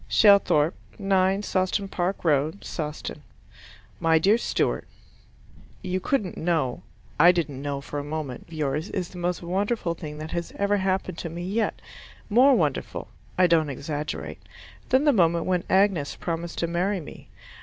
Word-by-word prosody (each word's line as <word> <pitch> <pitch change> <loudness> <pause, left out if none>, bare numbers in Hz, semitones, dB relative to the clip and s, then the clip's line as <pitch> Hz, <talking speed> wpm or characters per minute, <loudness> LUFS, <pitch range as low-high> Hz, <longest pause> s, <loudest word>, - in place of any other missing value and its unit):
Shelthorpe, 195 -7 +5 0.2
9 195 0 +2
Sawston 190 +1 0
Park 185 0 -2
Road 155 +4 +1
Sawston 150 -2 -5 0.8
My 165 0 +4
Dear 200 +8 +4
Stewart, - - -1 1.0
You 185 0 -1
couldn't 200 -2 -1
know. 160 -7 0 0.4
I 175 +4 +8
didn't 155 -6 -2
know 140 -1 -3
for 145 +1 -5
a - - -4
moment. 145 -4 -5
But - - -25
this 160 - -9
letter - - +3
of 135 - 0
yours 155 +7 -3
is 180 -3 -3
the 180 - -10
most 175 0 -2
wonderful 190 +1 -1
thing 150 -3 -8
that 155 +1 -7
has 170 -1 -4
ever 200 +1 +2
happened 190 -2 -1
to 170 - -4
me 170 +2 -6
yet 210 +5 -1 0.5
more 260 +5 +6
wonderful - - -1 0.3
(I 185 - +6
don't 165 -3 +3
exaggerate) 145 +2 -5 0.5
than 260 +2 +4
the 295 -2 +4
moment 170 -5 +3
when 180 -1 0
Agnes 190 -7 +2
promised 170 0 -4
to 170 - 0
marry 180 +4 0
me. 150 - -11
175 Hz, 165 wpm, -25 LUFS, 155-195 Hz, 1.0 s, I